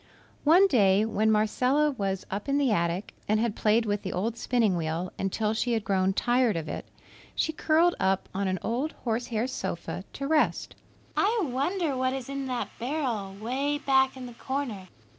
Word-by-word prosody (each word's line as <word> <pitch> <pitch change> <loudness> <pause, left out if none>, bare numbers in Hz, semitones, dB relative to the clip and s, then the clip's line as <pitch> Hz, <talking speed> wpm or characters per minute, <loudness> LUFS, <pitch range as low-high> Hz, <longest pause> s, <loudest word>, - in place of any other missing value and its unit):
One 345 +6 +7
day 205 - +4
when 220 0 +1
Marcella 250 +8 +2
was 195 -7 -3
up 200 +7 -4
in 275 - +2
the 275 -4 +2
attic 170 0 -1
and 215 +1 +2
had 225 -1 0
played 225 +2 +2
with 205 -1 -1
the 190 - -4
old 220 +5 -1
spinning 230 -5 +1
wheel 165 +2 -2
until 210 +3 0
she 240 +2 0
had 225 -2 0
grown 190 -3 +2
tired 240 -2 +2
of 160 -1 -4
it, - - -5 0.5
she 320 - 0
curled 330 +3 +3
up 190 0 +1
on 195 0 -1
an 185 0 0
old 260 +8 -1
horse 240 +1 -3
hair 225 -1 -1
sofa 190 -7 -4
to 275 - -4
rest. 315 0 +1 0.4
"I 435 +3 +2
wonder 295 +3 -1
what 255 0 0
is 265 -1 -5
in 275 -1 -3
that 250 -1 -2
barrel, 235 -7 -2
'way 270 +6 -1
back 265 -2 +2
in 255 - -7
the 245 - -9
corner?" 240 -7 -4
235 Hz, 185 wpm, -27 LUFS, 200-275 Hz, 0.5 s, One